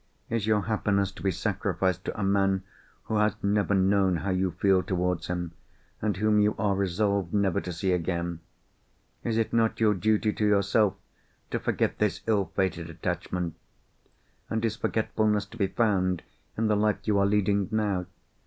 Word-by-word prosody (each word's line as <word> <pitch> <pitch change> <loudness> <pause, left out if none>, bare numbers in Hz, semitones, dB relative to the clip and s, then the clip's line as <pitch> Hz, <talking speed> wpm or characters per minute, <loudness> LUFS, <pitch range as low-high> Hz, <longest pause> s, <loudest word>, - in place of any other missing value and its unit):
Is 115 -2 0
your 105 -1 +3
happiness 100 -2 0
to - - -13
be 95 - +1
sacrificed 95 0 -1
to - - -4
a - - -1
man 95 -1 +2 0.4
who 110 - -1
has 105 -1 +2
never 100 0 +2
known 95 -1 +3
how 95 +4 -2
you 95 0 +1
feel 95 +2 +2
towards 90 -2 -1
him, 90 -1 -3 0.5
and 105 -4 0
whom 105 +1 +3
you 105 +1 +3
are 100 -1 +1
resolved 100 0 0
never 100 -4 +2
to 90 - -5
see 90 +3 -1
again? 85 -1 -1 0.8
Is 115 -1 -1
it 115 - 0
not 115 -1 +2
your 110 -2 +4
duty 110 +2 +1
to - - -3
yourself 105 0 +3 0.6
to - - 0
forget - - -1
this - - 0
ill 105 -4 +1
fated 90 -3 -1
attachment? 85 +1 -3 1.0
and 110 0 -1
is 110 -1 0
forgetfulness 110 -2 0
to 110 +3 -13
be 100 -3 +1
found 95 -5 +1 0.3
in 115 - +1
the 105 -1 +3
life 105 0 +2
you 105 -2 +2
are 100 - +3
leading 100 -1 +2
now? 100 -5 0
100 Hz, 170 wpm, -27 LUFS, 95-105 Hz, 1.0 s, your